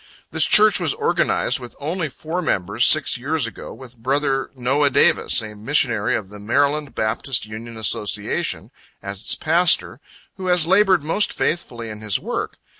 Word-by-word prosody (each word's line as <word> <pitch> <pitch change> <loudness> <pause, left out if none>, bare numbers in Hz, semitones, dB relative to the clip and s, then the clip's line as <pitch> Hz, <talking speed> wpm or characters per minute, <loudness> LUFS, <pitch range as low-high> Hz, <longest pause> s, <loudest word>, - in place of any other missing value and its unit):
This - - +3
Church 215 -1 +6
was 165 -5 0
organized - - 0
with 120 - -11
only 160 +2 -3
four 160 +6 -5
members, 95 - +1
six - - +3
years 145 +1 -1
ago, 115 - -8
with 125 +1 -12
brother 135 +2 -1
Noah 135 +3 +1
Davis, 125 - +3
a 105 -1 -8
missionary 115 0 0
of 100 -3 -5
the 105 0 -11
Md. 140 +7 0
Baptist 110 +3 -1
Union 110 +2 -9
Association, 105 -1 -2 0.3
as 100 0 -6
its - - 0
pastor, 165 -5 +2 0.4
who 185 -1 -6
has 180 -3 +3
labored 190 -2 +3
most 165 +7 +1
faithfully 120 -9 -3
in 105 0 -10
his 105 -2 0
work. - - -5
135 Hz, 160 wpm, -20 LUFS, 110-160 Hz, 0.4 s, Church